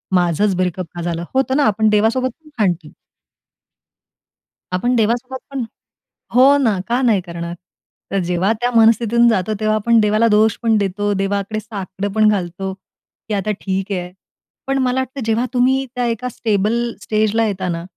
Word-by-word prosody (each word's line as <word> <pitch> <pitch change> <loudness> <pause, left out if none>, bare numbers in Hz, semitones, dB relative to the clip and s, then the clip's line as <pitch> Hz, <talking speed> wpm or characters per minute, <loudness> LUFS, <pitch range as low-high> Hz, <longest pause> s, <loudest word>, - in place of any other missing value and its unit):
माझंच 180 +2 +2
ब्रेकअप 180 -1 -1
का 175 - -5
झालं 170 0 -3
होतं 265 +1 +1
ना?" 295 - +3
आपण 215 +1 +2
देवासोबत 225 +5 +2
पण 305 - -17
भांडतो. 175 -7 0 1.8
आपण 240 +7 +1
देवासोबत 240 +4 0
पण 270 -3 -2 0.7
हो, 270 +3 +6
ना, 220 -9 +1
का 240 +2 +1
नाही 225 -7 +3
करणार? 170 -1 -6 0.6
तर 195 - +1
जेव्हा 180 +3 0
त्या 245 - +2
मनस्थितीतून 230 +1 +4
जातो, 210 -1 0
तेव्हा 215 0 +1
आपण 230 +2 +3
देवाला 215 +2 +3
दोष 215 0 +3
पण 225 -2 +3
देतो, 205 +1 -1
देवाकडे 200 +2 -2
साकडं 200 -2 -5
पण 215 0 +4
घालतो, 190 -1 -2
की 195 +2 -13
आता 205 +1 -1
ठीक 195 +1 -2
आहे. 180 -2 -3 0.6
पण 270 - +1
मला 260 -1 +1
वाटतं, 260 +1 -4
जेव्हा 225 +2 +1
तुम्ही 260 +2 +2
त्या 245 -1 0
एका 235 +2 -2
स्टेबल 215 -2 0 0.3
स्टेजला 220 +1 +1
येता 190 -3 -2
ना, 170 0 -3
215 Hz, 160 wpm, -19 LUFS, 190-235 Hz, 1.8 s, हो